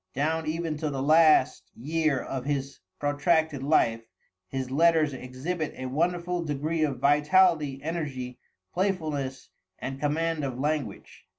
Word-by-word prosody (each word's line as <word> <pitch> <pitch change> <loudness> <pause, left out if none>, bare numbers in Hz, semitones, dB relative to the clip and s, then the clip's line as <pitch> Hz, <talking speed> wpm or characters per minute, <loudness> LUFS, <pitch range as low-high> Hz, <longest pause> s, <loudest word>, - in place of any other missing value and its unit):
Down 160 +3 0
even 160 -1 -2
to 150 0 -2
the 135 -2 -4
last 155 -2 +4
year 155 +2 0
of 130 0 -5
his 140 -1 -3 0.2
protracted 150 0 +1
life, 120 -6 +2 0.5
his 130 +4 -4
letters 160 0 +3
exhibit 135 +6 -4
a 130 - -6
wonderful 175 +5 -1
degree 155 +2 -2
of 145 -4 0
vitality, 150 +1 +3
energy, 140 -6 -4 0.3
playfulness, 155 -9 -2 0.3
and 135 +1 -6
command 155 +2 0
of 130 -3 -3
language. 145 -6 -4
150 Hz, 125 wpm, -27 LUFS, 135-165 Hz, 0.5 s, last